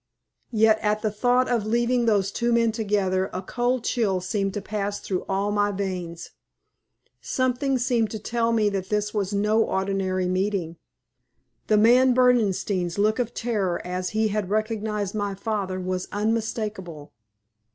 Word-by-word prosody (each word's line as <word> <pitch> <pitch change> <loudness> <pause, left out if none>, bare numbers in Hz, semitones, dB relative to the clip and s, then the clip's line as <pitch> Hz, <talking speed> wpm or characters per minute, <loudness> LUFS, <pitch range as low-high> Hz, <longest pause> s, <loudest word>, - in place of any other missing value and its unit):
Yet 220 -1 +4
at 215 0 0
the 215 - +1
thought 245 +4 +2
of 230 -4 0
leaving 240 +1 +1
those 200 -3 +2
two 235 +2 0
men 230 -1 +3
together 200 -4 0
a 185 - -5
cold 245 +4 -1
chill 205 -7 0
seemed 195 +2 -1
to - - -1
pass 205 0 -3
through 185 -2 -3
all 195 +1 0
my 205 0 +1
veins. 180 -4 -5 0.9
Something 255 +1 0
seemed 240 -3 +1
to 220 - -5
tell 230 +2 -1
me 220 -2 +2
that 195 -2 -4
this 210 0 -1
was 200 -2 -1
no 210 +2 +2
ordinary 190 -2 -1
meeting. 185 -3 -1 0.9
The 215 - +4
man 245 +4 +5
Berdenstein's 205 -8 +2
look 215 +3 +2
of 240 -1 -2
terror 205 -7 -1
as 180 +1 -3
he 220 0 +1
had 205 -2 -2
recognized 215 -1 -1
my 205 -2 -2
father 195 -2 -3
was 185 0 -3
unmistakable. 210 -7 -3
210 Hz, 150 wpm, -24 LUFS, 190-225 Hz, 0.9 s, man